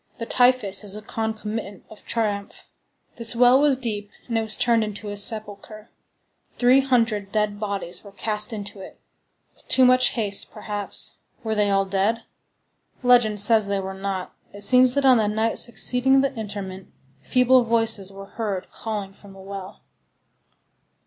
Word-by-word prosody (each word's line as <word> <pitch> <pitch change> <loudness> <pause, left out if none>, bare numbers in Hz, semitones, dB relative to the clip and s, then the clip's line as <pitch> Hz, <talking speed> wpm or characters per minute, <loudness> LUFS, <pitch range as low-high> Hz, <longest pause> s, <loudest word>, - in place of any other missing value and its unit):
The 230 - -5
typhus 245 -6 +3
is 205 -1 -3
a 210 - -8
concomitant 220 -2 -5
of 215 - -15
triumph. 205 -3 -3 0.5
This 230 0 0
well 245 +2 +5
was 290 -3 +3
deep, 210 -5 -4 0.2
and 235 - -3
it 225 - +2
was 220 -2 -2
turned 230 -2 +2
into 210 0 -6
a - - -5
sepulchre. 215 +1 -1 0.7
Three 250 +2 +5
hundred 230 -6 0
dead 210 -1 -1
bodies 200 -4 -4
were 200 - -13
cast 210 +2 -2
into 205 -2 -6
it. 190 - -12 0.5
With - - -23
too 260 - +4
much 255 0 +4
haste 205 -3 0
perhaps. 205 -2 -3 0.3
Were 220 -1 -2
they 210 -1 +1
all 195 0 +2
dead? 200 +4 -1 0.8
Legend 240 -4 +4
says 215 0 +5
they 200 0 -1
were 190 0 -5
not. 190 -1 -5 0.2
It 205 - -11
seems 250 +4 +4
that 280 -1 +1
on 260 -2 +6
the 215 -2 +1
night 220 +2 0
succeeding 250 +2 +2
the 275 0 -1
interment, 200 -4 -7 0.3
feeble 255 - +3
voices 225 -4 0
were 195 0 -10
heard 200 -3 -5
calling 210 -3 -6
from 200 0 -16
the 195 - -15
well. 195 0 -9
215 Hz, 160 wpm, -23 LUFS, 200-235 Hz, 0.8 s, on